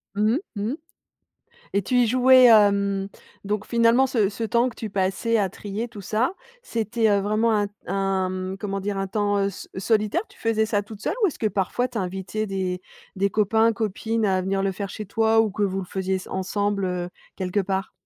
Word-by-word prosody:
Mmh 215 Hz, +2 st, +2 dB
mh, -, -, +2 dB, 0.2 s
mmh 215 Hz, -, -1 dB
mh -, -, -2 dB, 1.0 s
et 200 Hz, -, +2 dB
tu 250 Hz, -, -2 dB
y 245 Hz, -2 st, +4 dB
jouais, 255 Hz, +1 st, +6 dB
hem, 200 Hz, -3 st, +4 dB, 0.4 s
donc 210 Hz, +1 st, -2 dB
finalement 235 Hz, +3 st, +4 dB
ce 215 Hz, -6 st, +1 dB
ce 225 Hz, +2 st, -5 dB
temps 235 Hz, +3 st, +2 dB
que 240 Hz, -, -14 dB
tu 220 Hz, -2 st, -5 dB
passais 195 Hz, +4 st, 0 dB
à 195 Hz, -3 st, +1 dB
trier 205 Hz, +5 st, -5 dB
tout 210 Hz, -3 st, -10 dB
ça, 220 Hz, -, 0 dB, 0.3 s
c'était, 225 Hz, -, 0 dB
heu, 200 Hz, -1 st, +3 dB
vraiment 215 Hz, +2 st, +1 dB
un 205 Hz, -1 st, +1 dB, 0.2 s
un 190 Hz, -1 st, -1 dB
comment 195 Hz, -2 st, -3 dB
dire, 200 Hz, 0 st, -3 dB
un 195 Hz, 0 st, -2 dB
temps, 205 Hz, 0 st, 0 dB
heu, 195 Hz, 0 st, +1 dB
so 195 Hz, -, -9 dB
solitaire, 215 Hz, -, +1 dB
tu -, -, -20 dB
faisais 220 Hz, -1 st, +1 dB
ça 205 Hz, -2 st, 0 dB
toute 215 Hz, 0 st, -11 dB
seule -, -, -1 dB
ou -, -, +6 dB
est-ce 315 Hz, -, -6 dB
que 220 Hz, -, +1 dB
parfois 210 Hz, +5 st, -1 dB
tu 240 Hz, -, -6 dB
invitais 190 Hz, +3 st, -3 dB
des 185 Hz, -2 st, -2 dB, 0.3 s
des 200 Hz, +1 st, +1 dB
copains, 220 Hz, +2 st, +3 dB
copines 220 Hz, +1 st, -1 dB
à 190 Hz, -2 st, +2 dB
venir 195 Hz, +1 st, -1 dB
le 195 Hz, -, +1 dB
faire 195 Hz, +1 st, -5 dB
chez 215 Hz, -, -6 dB
toi 225 Hz, +2 st, +2 dB
ou 220 Hz, -, +1 dB
que 205 Hz, +1 st, -1 dB
vous 195 Hz, -1 st, 0 dB
le 185 Hz, -, -5 dB
faisiez 190 Hz, 0 st, -2 dB
sen 185 Hz, -, -10 dB
ensemble, 200 Hz, +1 st, -1 dB
heu, 180 Hz, -1 st, -2 dB, 0.3 s
quelque 185 Hz, +2 st, -1 dB
part? 190 Hz, 0 st, -2 dB
205 Hz, 215 wpm, -24 LUFS, 195-225 Hz, 1.0 s, jouais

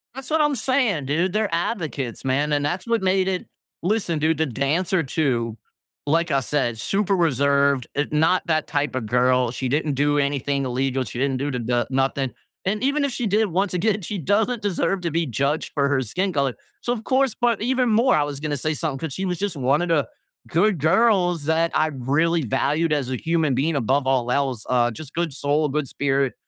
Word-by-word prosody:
That's 270 Hz, 0 st, -7 dB
what 315 Hz, 0 st, +2 dB
I'm 295 Hz, -1 st, +2 dB
saying, 240 Hz, -, +1 dB
dude. 170 Hz, +7 st, 0 dB
They're 215 Hz, -4 st, 0 dB
advocates, 160 Hz, -, -3 dB
man. 145 Hz, +3 st, +1 dB
And 145 Hz, 0 st, +1 dB
that's 180 Hz, +8 st, -3 dB
what 230 Hz, -2 st, +1 dB
made 190 Hz, 0 st, +2 dB
it 185 Hz, -1 st, -2 dB, 0.4 s
listen, 180 Hz, -5 st, 0 dB
dude, 155 Hz, 0 st, +1 dB
the 160 Hz, -, +1 dB
dancer 160 Hz, -, 0 dB
too, 125 Hz, -6 st, -1 dB, 0.5 s
like 165 Hz, +3 st, +1 dB
I 140 Hz, -, +3 dB
said, 130 Hz, -3 st, -1 dB
super 195 Hz, -, 0 dB
reserved, 140 Hz, -5 st, +2 dB
eh, 145 Hz, -, +1 dB
not 165 Hz, +4 st, +2 dB
that 155 Hz, -1 st, +1 dB
type 145 Hz, -3 st, -1 dB
a 130 Hz, -, -1 dB
girl. 125 Hz, +2 st, +2 dB
She 130 Hz, +1 st, -3 dB
didn't 150 Hz, +2 st, 0 dB
do 145 Hz, +2 st, +1 dB
anything 140 Hz, -1 st, 0 dB
illegal. 130 Hz, +1 st, -1 dB
She 120 Hz, -, -7 dB
didn't 135 Hz, -1 st, 0 dB
do 145 Hz, +2 st, -2 dB
the 125 Hz, -, -2 dB
the 120 Hz, +1 st, 0 dB
nothing. 135 Hz, 0 st, 0 dB, 0.3 s
And 210 Hz, +5 st, -1 dB
even 280 Hz, +1 st, +2 dB
if 280 Hz, -, -2 dB
she 240 Hz, -1 st, -2 dB
did, 215 Hz, +2 st, +2 dB
once 185 Hz, +2 st, -1 dB
again, 205 Hz, +3 st, +1 dB
she 200 Hz, +3 st, -4 dB
doesn't 215 Hz, -, 0 dB
deserve 195 Hz, -1 st, 0 dB
to 170 Hz, -3 st, -2 dB
be 165 Hz, +1 st, 0 dB
judged 140 Hz, +4 st, -1 dB
for 140 Hz, -2 st, +1 dB
her 140 Hz, -2 st, +1 dB
skin 180 Hz, -, -2 dB
color. 140 Hz, -3 st, 0 dB, 0.3 s
So, 240 Hz, -, -2 dB
of 235 Hz, -2 st, -3 dB
course 260 Hz, -2 st, +1 dB
but 235 Hz, -4 st, +1 dB
even 255 Hz, +1 st, +1 dB
more, 235 Hz, +4 st, +4 dB
I 150 Hz, -, +3 dB
was 145 Hz, -1 st, -5 dB
gonna 150 Hz, -1 st, -2 dB
say 155 Hz, +4 st, -1 dB
something 150 Hz, -3 st, -3 dB
'cause 160 Hz, -4 st, -4 dB
she 190 Hz, -, -3 dB
was 180 Hz, -2 st, -2 dB
just 200 Hz, -3 st, -2 dB
one 140 Hz, +3 st, +1 dB
of 175 Hz, -, -2 dB
the 150 Hz, -7 st, +2 dB, 0.4 s
good 185 Hz, +1 st, +2 dB
girls 180 Hz, -, +3 dB
that 165 Hz, +1 st, +1 dB
I 155 Hz, -, +2 dB
really 150 Hz, +6 st, +1 dB
valued 150 Hz, +7 st, 0 dB
as 140 Hz, -4 st, -1 dB
a 130 Hz, -, -1 dB
human 160 Hz, -2 st, 0 dB
being 150 Hz, +5 st, 0 dB
above 135 Hz, +1 st, +1 dB
all 125 Hz, -2 st, +1 dB
else. 130 Hz, -4 st, -1 dB
Uh, 120 Hz, -1 st, +2 dB
just 145 Hz, +5 st, -10 dB
good 170 Hz, -4 st, -2 dB
soul, 145 Hz, +2 st, 0 dB
a -, -, -1 dB
good 145 Hz, 0 st, -1 dB
spirit. 135 Hz, -1 st, 0 dB
155 Hz, 215 wpm, -23 LUFS, 135-185 Hz, 0.5 s, more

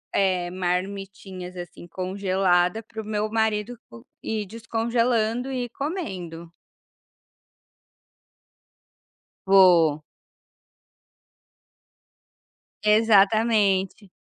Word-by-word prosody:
eh, 185 Hz, -3 st, +1 dB
marmitinhas 185 Hz, 0 st, -4 dB
assim 175 Hz, 0 st, -9 dB
congelada 185 Hz, +1 st, 0 dB
para 220 Hz, 0 st, -8 dB
o -, -, -12 dB
meu 215 Hz, 0 st, -2 dB
marido 220 Hz, +1 st, 0 dB
co 115 Hz, 0 st, -14 dB, 0.2 s
ir 215 Hz, -1 st, -3 dB
descongelando 230 Hz, +2 st, -1 dB
e 255 Hz, -2 st, -2 dB
ir -, -, -10 dB
comendo. 185 Hz, -, -6 dB, 2.9 s
Vou. 175 Hz, -6 st, +5 dB, 2.8 s
Exatamente. 210 Hz, -2 st, +3 dB
200 Hz, 65 wpm, -24 LUFS, 180-220 Hz, 2.9 s, Vou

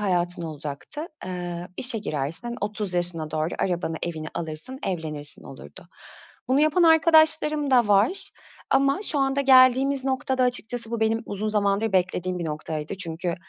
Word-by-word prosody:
hayatın 175 Hz, -3 st, -1 dB
olacaktı. 155 Hz, -, -6 dB, 0.2 s
Eee, 175 Hz, -1 st, -5 dB
işe 245 Hz, -2 st, 0 dB
girersin, 165 Hz, -, -3 dB
30 205 Hz, -2 st, -3 dB
yaşına 175 Hz, -3 st, 0 dB
doğru 155 Hz, +2 st, -2 dB
arabanı, 175 Hz, -3 st, -1 dB
evini 160 Hz, -2 st, -4 dB
alırsın, 165 Hz, +11 st, -5 dB
evlenirsin, 155 Hz, -5 st, -1 dB
olurdu. -, -, -12 dB, 0.6 s
Bunu 265 Hz, +3 st, +3 dB
yapan 310 Hz, +4 st, +3 dB
arkadaşlarım 315 Hz, -2 st, +5 dB
da 245 Hz, -5 st, +4 dB
var 205 Hz, -, +2 dB, 0.4 s
ama 275 Hz, +5 st, +2 dB
şu 310 Hz, -8 st, -1 dB
anda 270 Hz, 0 st, +1 dB
geldiğimiz 265 Hz, 0 st, +5 dB
noktada 260 Hz, -1 st, 0 dB
açıkçası 245 Hz, -2 st, -2 dB
bu 235 Hz, -1 st, -3 dB
benim 225 Hz, +1 st, +1 dB
uzun 205 Hz, +2 st, -3 dB
zamandır 205 Hz, 0 st, 0 dB
beklediğim 180 Hz, -1 st, 0 dB
bir 170 Hz, -, -4 dB
noktaydı 155 Hz, +2 st, -5 dB
çünkü 175 Hz, -1 st, -3 dB
205 Hz, 140 wpm, -24 LUFS, 170-260 Hz, 0.6 s, arkadaşlarım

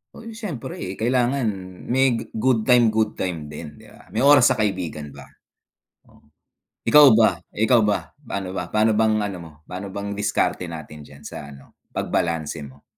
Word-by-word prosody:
Uy, 230 Hz, 0 st, -9 dB
siyempre 165 Hz, -, -6 dB
kailangan 125 Hz, +2 st, +1 dB, 0.4 s
may 130 Hz, -1 st, +3 dB
g -, -, -3 dB
good 115 Hz, 0 st, +1 dB
time, 120 Hz, -1 st, +5 dB
good 110 Hz, 0 st, 0 dB
time 80 Hz, -5 st, -4 dB
din 75 Hz, -1 st, -9 dB
'di -, -, -17 dB
ba? -, -, -18 dB
May -, -, 0 dB
oras 140 Hz, -3 st, +7 dB
sa 130 Hz, -, +2 dB
kaibigan 90 Hz, -9 st, -3 dB
ba. 70 Hz, -1 st, -12 dB, 0.8 s
O, -, -, -23 dB, 0.7 s
ikaw 150 Hz, -3 st, +8 dB
ba, 110 Hz, 0 st, +4 dB, 0.2 s
ikaw 110 Hz, +1 st, +3 dB
ba? 105 Hz, +6 st, -1 dB
Pa'no 95 Hz, -6 st, -5 dB
ba, -, -, -4 dB
pano 110 Hz, 0 st, +3 dB
bang 110 Hz, 0 st, +2 dB
ano 100 Hz, -3 st, -3 dB
mo, 80 Hz, -, -12 dB, 0.2 s
pa'no 95 Hz, +2 st, -6 dB
bang 100 Hz, +1 st, -5 dB
diskarte 105 Hz, -2 st, 0 dB
natin 75 Hz, -2 st, -9 dB
diyan 70 Hz, 0 st, -15 dB
sa 70 Hz, -, -8 dB
ano 70 Hz, -1 st, -16 dB, 0.2 s
pag-balanse 80 Hz, -2 st, -2 dB
mo? 70 Hz, 0 st, -13 dB
105 Hz, 170 wpm, -22 LUFS, 85-120 Hz, 0.8 s, ikaw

